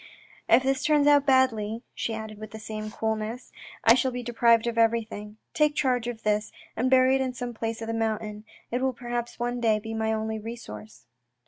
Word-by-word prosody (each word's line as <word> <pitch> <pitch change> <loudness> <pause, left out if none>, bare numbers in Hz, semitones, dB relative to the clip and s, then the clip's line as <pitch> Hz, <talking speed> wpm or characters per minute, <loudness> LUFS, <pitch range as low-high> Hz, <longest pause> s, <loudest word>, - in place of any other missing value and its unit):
" - - -27
If 260 - -1
this 270 0 0
turns 295 -1 +3
out 290 -1 +5
badly," 235 -4 +2
she 225 - -3
added 220 -1 -7
with 215 0 -8
the 220 - -9
same 215 0 -6
coolness, 220 +2 -3 0.2
" - - -19
I 225 - +8
shall 260 +1 +2
be 250 -1 -5
deprived 235 -1 +3
of 235 -1 -1
everything. 225 -2 0 0.2
Take 300 -1 +2
charge 250 -4 +1
of 230 -2 -5
this, 210 0 0 0.2
and 250 +3 +1
bury 260 0 +5
it 270 - +2
in 260 -1 -1
some 245 0 -4
place 225 0 -4
of - - -5
the 225 - -2
mountain. 215 -2 -2 0.3
It 245 +2 -1
will 265 0 +1
perhaps 240 0 -4
one 245 0 -2
day 220 -2 +3
be 220 +1 -6
my 220 0 0
only 220 0 -2
resource." 110 - -9
230 Hz, 215 wpm, -27 LUFS, 220-250 Hz, 0.3 s, I